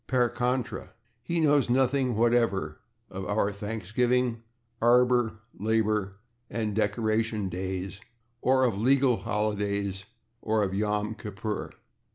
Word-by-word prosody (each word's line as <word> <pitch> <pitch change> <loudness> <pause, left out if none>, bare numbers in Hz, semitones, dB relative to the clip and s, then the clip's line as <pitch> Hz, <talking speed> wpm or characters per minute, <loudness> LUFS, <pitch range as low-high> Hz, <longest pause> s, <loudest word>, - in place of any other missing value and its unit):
/Per 125 -2 +2
contra/, 125 +1 -2 0.3
he 170 +8 -2
knows 145 -4 +3
nothing 130 0 +2
whatever 115 -9 +1 0.3
of 95 0 -5
our 105 0 +1
/Thanksgiving/, 115 +4 0 0.4
/Arbor/, 120 -1 +4 0.2
/Labor/ 105 -2 +1 0.4
and 110 -3 -2
/Decoration 110 -1 0
Days/, 95 +2 -4 0.4
or 130 0 +3
of 120 -3 +3
/legal 125 +4 +3
holidays/, 100 -2 -1 0.4
or 110 -1 +1
of 95 - -1
/Yom 105 +2 -1
Kippur 105 0 -5
110 Hz, 110 wpm, -28 LUFS, 100-125 Hz, 0.4 s, Arbor